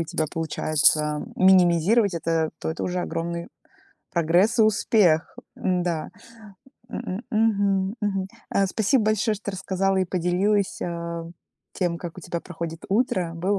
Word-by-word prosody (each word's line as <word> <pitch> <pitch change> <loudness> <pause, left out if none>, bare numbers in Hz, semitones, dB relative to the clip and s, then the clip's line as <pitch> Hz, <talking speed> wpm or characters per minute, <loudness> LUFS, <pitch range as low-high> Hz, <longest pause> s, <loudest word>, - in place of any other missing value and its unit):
у - - 0
тебя 160 0 -2
получается 155 -2 +1
минимизировать 185 +2 +4
это, 165 -1 0
то - - -3
это 160 - -5
уже 180 0 -1
огромный 170 0 -4 0.6
прогресс 175 +7 +2
и - - +8
успех. 205 -6 +3 0.2
М-да. 175 -3 -1 0.8
М, - - -4
м, 190 +6 -4
мгм, 200 -2 +1
мгм. 195 -2 -1 0.2
А, 195 - +2
спасибо 220 +4 +2
большое, 215 0 +2
что 200 -1 -5
рассказала 190 0 0
и 190 - +2
поделилась, 185 +3 0
а, 170 -1 -4 0.5
тем, 175 -3 -1
как 175 0 -7
у - - -7
тебя 170 +1 -4
проходит 165 -2 -7
утро. 190 -5 +1
Было 190 +4 0
180 Hz, 140 wpm, -24 LUFS, 170-200 Hz, 0.8 s, и